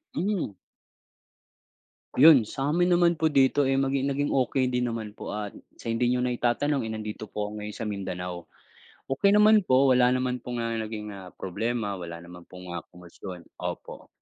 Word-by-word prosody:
Mm. 180 - -1 1.6
Yun, 135 -6 +7
sa'min 150 +9 0
naman 175 -2 +3
po 160 - +3
dito, 140 -1 +3
eh, 135 - +2
maging 135 0 +1
naging 140 +1 0
okey 130 0 +1
din 125 0 0
naman 115 -2 -4
po 105 - -7
at 105 -1 -4 0.2
sa 115 - -5
hindi 115 +2 +1
niyo 125 0 +1
na 125 - 0
itatanong, 120 +2 0
eh, - - -4
nandito 110 0 -6
po 105 0 -4
ako 105 - -7
ngayon 105 0 -6
sa - - -5
Mindanao. 90 -4 -5 0.6
Okey 200 +10 +2
naman 215 +1 +7
po 130 +1 +5
wala 125 0 +5
naman 125 0 0
pong, 120 -1 -4
ah, 115 - -2
naging, 105 -1 -5
ah, 95 -2 -9
problema 105 +2 -2
wala 85 -1 -6
naman 90 0 -13
pong 90 -1 -9
ah, 85 - -3
komosyon, 90 0 -10 0.2
opo. - - -6
120 Hz, 175 wpm, -27 LUFS, 105-135 Hz, 1.6 s, Yun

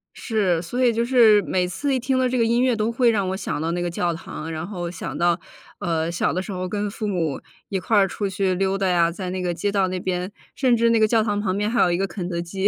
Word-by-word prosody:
是， 195 -8 0
所 245 +9 -2
以 245 - +5
就 230 +1 0
是， 230 -5 +6
每 180 0 0
次 280 +10 -2
一 260 - +1
听 260 +1 0
到 255 -1 +2
这 250 0 -1
个 230 - +3
音 235 +2 +2
乐 255 -2 +3
都 220 +1 0
会 235 0 +3
让 200 -4 0
我 190 - -2
想 180 - -3
到 165 +1 -1
那 175 0 -2
个 175 - -1
教 170 0 -1
堂， 160 0 -7
然 160 0 -4
后 175 -4 -4
想 165 -4 -6
到 175 0 +2 0.4
呃， 165 -1 -1
小 170 - 0
的 185 - -1
时 200 - -7
候 185 -1 -3
跟 205 +2 -2
父 210 +1 -4
母 165 -8 -1 0.3
一 195 - -1
块 220 +4 0
儿 195 -1 +5
出 200 +1 -3
去 190 -1 0
溜 195 +1 0
达 195 -1 0
呀， 170 -2 +3
在 180 +1 -5
那 185 0 -3
个 175 -1 -1
街 205 +4 -1
道 195 -2 +2
那 185 0 -3
边， 180 0 -2 0.3
甚 255 -3 +3
至 230 0 +3
那 230 -1 +3
个 215 - +5
教 220 0 +3
堂 205 -2 -1
旁 195 -2 -1
边 210 +1 0
还 240 +1 +2
有 175 - +4
一 175 - +1
个 195 +1 0
肯 180 -1 -5
德 170 -1 -2
基。 190 +3 -1
190 Hz, 315 characters per minute, -23 LUFS, 175-220 Hz, 0.4 s, 是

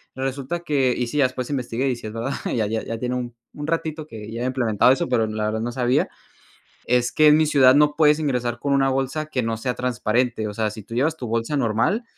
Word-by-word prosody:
resulta 135 +5 -3
que 140 -6 +1
y 125 - -1
sí, 130 - -4
ya 140 - +5
después 130 -1 -3
investigué 130 -1 -1
y 125 - 0
si 115 - -8
es 105 - -7
verdad, 115 +4 -3 0.2
ya 110 -3 0
ya 110 +1 -2
ya 115 - -4
tiene 125 +1 -2
un 120 -1 -4 0.2
un 145 0 -6
ratito 160 -1 -2
que 110 -4 -9
ya 115 - -5
habían 125 - 0
implementado 120 -3 +3
eso, 170 +5 -2
pero 115 -3 +2
la 110 0 -3
verdad 110 +1 -1
no 120 +1 -2
sabía, 125 0 +1 0.8
es 125 0 +2
que 155 - +4
en 150 0 +7
mi 155 - +3
ciudad 135 -3 +5
no 150 0 +4
puedes 150 -1 +4
ingresar 125 -5 -1
con 140 +3 0
una 135 -1 +3
bolsa 135 +3 -1
que 130 -5 -2
no 115 0 -2
sea 125 +2 -2
transparente. 120 -1 0
O 105 - -6
sea, 110 -1 -1
si 110 +1 -9
tú 115 +3 -9
llevas 155 +6 +1
tu 125 - -6
bolsa 115 +5 -1
normal 115 - +1
125 Hz, 250 wpm, -23 LUFS, 115-145 Hz, 0.8 s, en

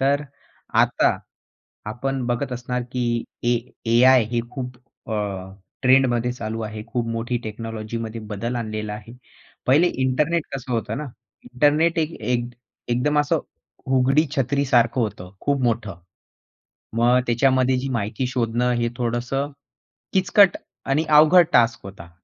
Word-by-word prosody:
तर 140 +2 +2 0.6
आता - - +2 0.7
आपण 130 +5 -3
बघत 125 +2 -2
असणार, 125 0 -3
की 120 -2 -1 0.2
ए 120 0 +3 0.3
एआय 125 +1 +6
हे 120 -1 +1
खूप 125 -2 -6 0.3
अ, - - -1 0.7
ट्रेंडमध्ये 130 -2 +3
चालू 115 -2 -5
आहे. 105 0 -5
खूप 115 0 -2
मोठी 115 +2 -2
टेक्नॉलॉजीमध्ये 115 +1 -5
बदल 115 +4 -3
आणलेला 110 -2 -4
आहे. 105 +2 -10 0.5
पहिले 145 +7 +5 0.2
इंटरनेट 150 +6 +1
कसं 130 -1 -5
होतं 115 -1 -2
ना 150 - -4 0.4
इंटरनेट 150 +6 +2
एक 160 0 0
एक 120 -1 0 0.4
एकदम 130 +5 +1
असं 145 - +1 0.5
उघडी 135 +4 +3
छत्री 140 +2 +1
सारखं 120 -1 +3
होतं. 105 -5 -3
खूप 140 -2 0
मोठं. 110 -6 -1 1.0
मग 120 +2 +4
त्याच्यामध्ये 130 +1 +3
जी 135 +2 -3
माहिती 115 +1 -2
शोधणं 125 -1 0
हे 120 - +1
थोडंस 120 0 -2 0.8
किचकट 190 0 +4 0.3
आणि 140 +4 +1
अवघड 155 +4 +7
टास्क 115 -1 +4
होता. 95 -4 -10
125 Hz, 130 wpm, -22 LUFS, 115-135 Hz, 1.0 s, अवघड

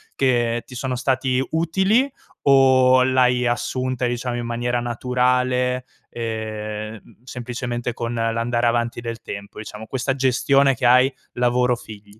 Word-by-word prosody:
che 120 -3 +1
ti 125 - -11
sono 130 +1 -2
stati 130 0 0
utili, 190 - +2 0.4
o 130 -2 +5
l'hai 125 -1 +3
assunta, 125 +2 -1
diciamo, 120 0 -2
in 120 - -4
maniera 120 +1 -1
naturale, 125 +1 0 0.2
ehm, 110 -1 -5
m - - -21
semplicemente 120 -1 -4
con 120 0 -4
l'andare 115 +1 0
avanti 120 0 0
del 115 -1 -6
tempo, 100 0 -8
diciamo, 110 0 -8
questa 135 +1 -1
gestione 135 +1 +3
che - - -3
hai 125 +2 +5 0.2
lavoro-figli? 120 -4 -1
125 Hz, 130 wpm, -22 LUFS, 115-130 Hz, 0.4 s, o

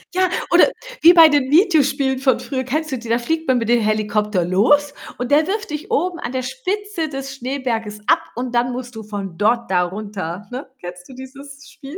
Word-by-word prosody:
Ja, 370 -1 +2 0.2
oder - - +6 0.3
wie 340 +2 +8
bei 330 -2 +9
den 285 -3 +1
Videospielen 285 -6 +3
von 265 -3 +2
früher, 260 +1 -4
kennst 305 +4 -3
du 260 - -3
die? 230 0 -10
Da 235 - +3
fliegt 320 +6 -3
man 260 -1 +3
mit 230 -2 -2
dem 240 -1 +3
Helikopter 210 -3 0
los 280 +11 +2 0.2
und 250 +1 -4
der 305 +2 +4
wirft 410 -3 -3
dich 305 +7 -6
oben 365 -6 -1
an - - -5
der 255 -1 -3
Spitze 335 +6 -3
des 270 -1 -6
Schneeberges 240 -5 -4
ab - - +4 0.2
und 245 0 -4
dann 240 +1 +1
musst 250 -1 -7
du 220 - -6
von 200 -4 -7
dort 235 +1 +1
da 180 -1 +3
runter, 195 -1 -6
ne? 260 +2 -7
Kennst 180 0 -10
du 260 - -11
dieses 275 +2 -12
Spiel? 280 +5 -11
260 Hz, 210 wpm, -20 LUFS, 220-290 Hz, 0.3 s, bei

